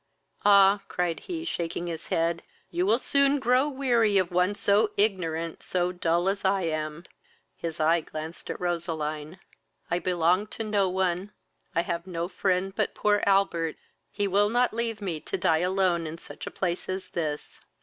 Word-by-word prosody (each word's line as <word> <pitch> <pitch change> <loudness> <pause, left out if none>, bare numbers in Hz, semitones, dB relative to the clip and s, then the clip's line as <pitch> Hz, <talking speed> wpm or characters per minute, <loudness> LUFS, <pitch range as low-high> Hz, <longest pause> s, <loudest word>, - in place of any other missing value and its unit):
"Ah! 200 0 +6
(cried 175 -3 -1
he, 335 -2 -5
shaking 170 - -3
his 165 -2 -5
head,) 165 +1 0 0.3
you 180 +2 0
will 220 +3 +5
soon 280 +2 +2
grow 260 +2 +3
weary 240 -7 +2
of 185 -2 +1
one 180 +3 +2
so 205 +1 +3
ignorant, 170 -6 0
so 180 -1 0
dull 175 0 0
as 195 +1 0
I 190 0 +2
am; 155 0 -3 0.5
(his 165 -1 -5
eye 165 +2 +3
glanced 155 +2 -8
at - - -4
Roseline.) 160 -2 -3 0.5
I 175 - +2
belong 180 +3 +2
to 225 - -2
no 205 -3 +1
one, 185 +1 -1 0.4
I 170 - +2
have 170 +1 -3
no 170 -2 -3
friend 185 +1 0
but - - -1
poor 205 -1 +2
Albert; 195 -5 +2 0.3
he 205 -1 -1
will 200 +2 +3
not 245 +1 +2
leave 225 -2 -2
me 170 -5 -2
to - - -4
die 165 -4 +2
alone 180 -2 +1
in 160 +2 -6
such - - -9
a - - -2
place 180 -1 -3
as 185 0 -4
this." 150 -3 -4
180 Hz, 170 wpm, -27 LUFS, 170-205 Hz, 0.5 s, Ah